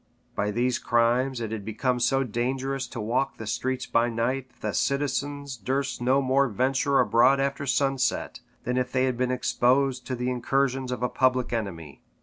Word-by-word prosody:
By 100 +1 -1
these 120 +4 0
crimes 120 +2 +1
it 110 -2 -4
had 110 -2 -4
become 125 +4 -1
so 135 +3 +2
dangerous 130 +3 -2
to 120 - -7
walk 125 +5 -1
the 110 - -7
streets 130 +4 -2
by 115 +1 +2
night, 125 +3 -1
that - - -31
the - - -3
citizens 140 0 -1
durst 130 +4 -2
no 130 +3 +3
more 135 +1 +3
venture 130 +5 +1
abroad 130 +4 +4
after 140 +1 -1
sunset, 135 -1 0 0.2
than 125 +1 -1
if 125 0 -1
they 130 0 +2
had 130 -1 0
been 125 +1 0
exposed 130 +1 +1
to 130 - -2
the 125 +1 -2
incursions 130 +1 0
of 125 -1 -3
a - - +3
public 130 -1 +1
enemy. 85 - -5
125 Hz, 180 wpm, -26 LUFS, 120-135 Hz, 0.2 s, abroad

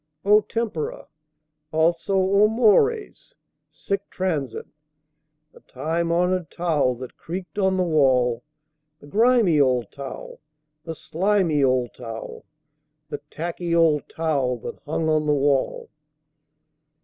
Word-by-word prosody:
O 210 +1 +6
tempora! 220 -9 -4 0.7
Also, 165 +4 +1
O 200 +2 +4
mores! 335 - +1 0.3
Sic 200 0 -4
transit 165 -8 -3 0.9
The - - -16
time 165 +2 -3
honored 180 0 +1
towel 155 -7 0
that 125 +1 -10
creaked 180 +1 -6
on 190 -1 +2
the 185 - +2
wall. 130 -7 +2 0.6
The - - -15
grimy 215 - +3
old 125 -5 +1
towel, 140 -1 -8 0.5
the 165 -1 -5
slimy 175 -4 +1
old 130 -2 +1
towel, 115 -2 -8 0.6
The 145 - -5
tacky 170 +1 -3
old 160 -3 +2
towel 140 -6 -1
that - - -7
hung 160 +1 -1
on 155 -1 +1
the 150 - +3
wall. 140 -1 0
165 Hz, 115 wpm, -23 LUFS, 140-190 Hz, 0.9 s, O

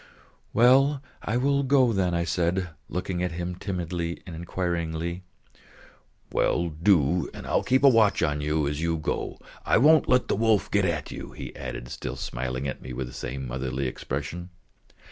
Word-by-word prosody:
"Well, 135 +4 +5 0.2
I 115 - -1
will 140 +2 +2
go 130 -3 +4
then," 90 -3 +1
I 85 - +1
said, 90 +1 0 0.2
looking 90 0 -2
at 90 -2 -1
him 90 +1 -3
timidly 90 -2 -3
and 85 - -7
inquiringly. 85 0 -3 1.1
"Well, 85 0 +1
do, 80 -1 +2
and - - -8
I'll - - +1
keep 130 +2 +2
watch 115 -9 +5
on 75 -1 0
you 75 0 0
as 75 +1 -2
you 85 0 0
go. 75 - -3 0.3
I - - +3
won't 155 +5 +5
let 125 0 +4
the - - +1
wolf 110 -1 +2
get 100 -2 +3
at 85 -4 -2
you," - - -8
he - - -8
added, - - -6
still - - -5
smiling 65 +2 -3
at 65 - -5
me 65 - -7
with 65 +1 -3
the - - -10
same 65 0 -5
motherly 65 +2 -3
expression. 75 +7 -4
85 Hz, 170 wpm, -26 LUFS, 75-105 Hz, 1.1 s, Well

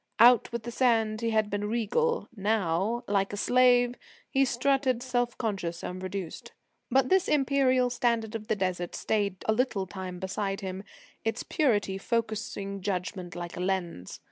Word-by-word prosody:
Out 240 0 +6
with 235 -1 -4
the 240 - -5
sand 225 -3 +2
he 230 - 0
had 215 -2 +1
been 205 0 -1
regal; 355 - 0
now, 205 +1 0
like 195 -1 +1
a - - -3
slave, 245 +1 +4 0.4
he 270 - +4
strutted 255 0 +1
self 245 -2 -1
conscious 190 -7 -3
and 180 +1 -5
reduced. 185 -2 -6 0.4
But 260 0 +3
this 380 -1 +3
imperial 265 -3 +3
standard 235 -3 0
of 220 -1 -5
the 220 - +1
Desert 185 -3 -2
stayed 200 -4 -1
a 220 - +3
little 220 -5 0
time 185 -1 -6
beside 195 +1 -3
him, 190 0 -5 0.4
its 225 +1 -1
purity 205 - +1
focussing 205 -3 -2
judgment 180 -1 -3
like 175 -1 -6
a - - -6
lens. 180 - -3
215 Hz, 160 wpm, -28 LUFS, 190-245 Hz, 0.4 s, Out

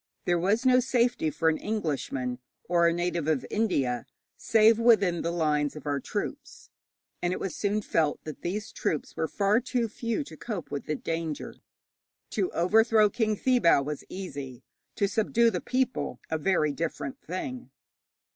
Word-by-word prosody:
There 175 -1 +2
was 205 +8 +1
no 255 0 +6
safety 245 -8 +1
for 160 +2 -1
an 160 -1 +3
Englishman 140 - -2 0.3
or 170 -1 +4
a - - +4
native 175 -2 -1
of 155 -5 +1
India, 135 - 0 0.3
save 225 0 +4
within 205 -7 +4
the - - -1
lines 150 -4 0
of 150 - -9
our 145 -1 0
troops, - - -6 0.5
and 175 - 0
it - - -2
was 185 -5 -4
soon 210 +1 0
felt 155 -5 +1
that 155 -2 -8
these 210 +5 -3
troops 155 -8 -2
were 160 - -1
far 205 +5 +2
too 250 -2 -1
few 230 +5 -2
to - - -11
cope 210 -9 -6
with 140 - -4
the 150 - 0
danger. 165 0 -4 0.8
To 370 - 0
overthrow 215 +4 +4
King 215 -1 +1
Thibaw 240 - +4
was 150 -1 -4
easy, 140 -10 -7 0.3
to 200 - +2
subdue 230 +3 +2
the 180 - -2
people 255 - -1
a 160 - 0
very 155 -3 +2
different 145 -3 -4
thing. 245 - -5
180 Hz, 165 wpm, -28 LUFS, 155-225 Hz, 0.8 s, no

